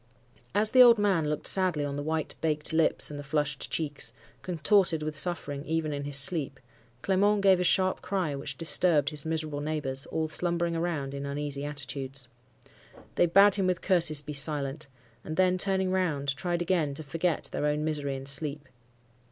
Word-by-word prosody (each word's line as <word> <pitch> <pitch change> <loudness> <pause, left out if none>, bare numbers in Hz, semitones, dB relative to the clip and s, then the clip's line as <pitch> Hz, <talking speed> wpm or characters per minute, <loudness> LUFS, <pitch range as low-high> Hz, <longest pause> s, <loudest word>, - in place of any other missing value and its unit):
As 210 +1 +2
the 255 - +6
old 240 -2 +8
man 190 -7 +1
looked 150 0 -4
sadly 180 -6 +2
on 140 -1 -4
the 145 - -4
white, 160 +1 -3
baked 155 -1 -1
lips, 160 -1 +2
and 145 - -7
the - - -7
flushed 150 -1 -2
cheeks, 145 -7 -1 0.3
contorted 170 - +1
with 155 0 -4
suffering 145 -3 +1
even 160 -1 -2
in 140 0 -5
his 145 -1 0
sleep, 140 0 +4 0.4
Clement 200 +1 +1
gave 190 -2 +5
a - - 0
sharp 185 +1 +2
cry 185 -7 -2
which 140 -1 -6
disturbed 160 -3 +1
his 150 0 -4
miserable 155 -2 -3
neighbours, 145 -3 -3
all 160 -1 -2
slumbering 170 +1 -1
around 165 -5 -3
in 140 0 -5
uneasy 140 0 -4
attitudes. 135 -2 -5 0.8
They 175 - +2
bade 200 +4 +5
him 195 -2 +1
with 185 -1 -2
curses 165 -6 +3
be 150 +1 -7
silent; 145 0 +1 0.4
and 155 - -7
then 185 0 +2
turning 190 -1 0
round, 150 -7 -1
tried 175 0 -2
again 165 -6 -1
to 155 - -7
forget 165 +3 -2
their 150 - -2
own 150 +1 -1
misery 145 -3 -3
in 135 0 -8
sleep. 145 +1 -1
155 Hz, 180 wpm, -27 LUFS, 145-175 Hz, 0.8 s, old